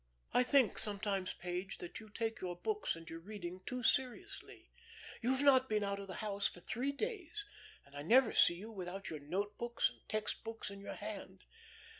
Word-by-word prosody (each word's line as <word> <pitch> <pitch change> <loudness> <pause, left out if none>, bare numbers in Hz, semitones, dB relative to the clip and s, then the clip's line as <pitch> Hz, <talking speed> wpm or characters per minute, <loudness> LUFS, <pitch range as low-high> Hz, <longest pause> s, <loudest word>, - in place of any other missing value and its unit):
"I - - +6
think 250 -3 +4
sometimes, 200 -2 0
Page, 180 +2 -3
that 175 - -6
you 220 -1 -12
take 225 +1 -2
your 180 -1 -2
books 425 - 0
and 165 0 -10
your 165 - -6
reading 185 -1 -6
too 250 0 -2
seriously. 255 +1 -1 0.5
You've 260 +3 +2
not 260 -2 +7
been 210 -1 +2
out 200 0 -1
of 200 - -6
the 190 - -6
house 200 -1 +1
for - - -9
three 250 +9 -1
days, 415 - -3 0.4
and 140 0 -17
I 145 - -4
never 235 - +6
see 170 - +6
you 210 +6 -7
without 190 -1 -5
your 155 - -4
note 195 +8 -2
books 235 0 +2
and - - -18
text 215 0 -1
books 225 -2 -5
in 200 0 -8
your - - -5
hand. 200 -3 -6
210 Hz, 195 wpm, -37 LUFS, 185-245 Hz, 0.5 s, not